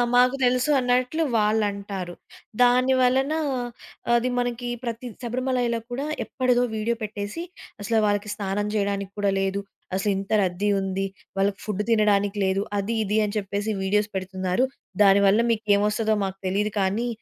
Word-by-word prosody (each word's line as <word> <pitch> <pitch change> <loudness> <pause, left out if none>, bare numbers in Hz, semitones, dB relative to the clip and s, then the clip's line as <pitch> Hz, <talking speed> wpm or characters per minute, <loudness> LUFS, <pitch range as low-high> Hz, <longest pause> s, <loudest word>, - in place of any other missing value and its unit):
మాకు 250 +2 +5
తెలుసు 250 +4 +2
అన్నట్లు 255 +5 +1
వాళ్ళంటారు. 200 -4 -1 0.5
దాని 250 +2 +5
వలన 265 +4 +3 0.8
అది 240 +1 +2
మనకి 245 0 -2 0.2
ప్రతి 235 +1 -4
శబరిమలైలో 245 -1 -1
కూడా 270 +4 -2 0.2
ఎప్పటిదో 250 -2 +1
వీడియో 225 +2 0
పెట్టేసి 205 +6 -5 0.4
అసలు 225 +2 0
వాళ్ళకి 205 0 0
స్నానం 205 0 -2
జేయడానికి 200 -2 -1
కూడా 200 -1 +2
లేదు. 195 +1 0 0.4
అసలింత 195 +1 -1
రద్దీ 185 +3 0
ఉంది. 195 0 -2 0.3
వాళ్ళకి 195 +1 +1
ఫుడ్ 210 -1 -2
తినడానికి 205 -2 +3
లేదు. 190 +1 +1 0.2
అది 205 +3 -1
ఇది 210 +1 0
అని 210 +1 -4
చెప్పేసి 205 +2 -2
వీడియోస్ 205 +2 +1
పెడుతున్నారు. 185 +3 -1 0.4
దానివల్ల 200 +1 +6
మీకు 220 -1 -1
ఏం 200 - +2
వస్తదో 215 0 +1
మాకు 190 0 -3
తెలీదు 205 +3 0
కానీ 200 +5 0
210 Hz, 140 wpm, -24 LUFS, 200-245 Hz, 0.8 s, దానివల్ల